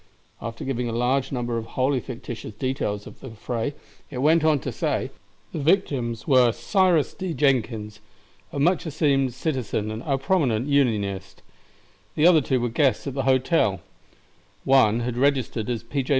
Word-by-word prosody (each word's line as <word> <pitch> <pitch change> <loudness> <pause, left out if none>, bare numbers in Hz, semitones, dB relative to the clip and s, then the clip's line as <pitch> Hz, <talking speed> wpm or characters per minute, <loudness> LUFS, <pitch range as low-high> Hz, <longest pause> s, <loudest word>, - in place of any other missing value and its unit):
After 115 0 -6
giving 125 -2 -2
a - - -4
large 130 +3 0
number 120 -3 -2
of 110 - -8
wholly 130 +1 +2
fictitious 115 -3 -8
details 105 -4 -2
of - - -12
the 130 - -9
fray, 115 +5 -4 0.3
it 135 - -7
went 155 +5 +3
on 155 -1 +4
to - - -4
say: - - -2 0.4
"The - - -4
victims 140 - 0
were 130 -4 +5
Cyrus 185 - +2
D. 185 -4 -4
Jenkins, 110 -7 0 0.5
a - - -6
much 170 +4 +2
esteemed 140 -4 +1
citizen 130 -7 -2
and 110 +1 -5
a 140 -3 0
prominent 135 -6 +1
Unionist; 100 -9 0 0.7
the 150 - +3
other 170 -3 +7
two 130 -1 0
were 120 0 -1
guests 135 +3 +1
at 140 - -4
the 135 -1 -2
hotel; 130 - +2 0.8
one 120 -4 +4
had 120 0 -3
registered 130 -4 0
as 120 -2 -2
P. 135 +4 -2
J. 130 - -8
130 Hz, 165 wpm, -24 LUFS, 115-145 Hz, 0.8 s, other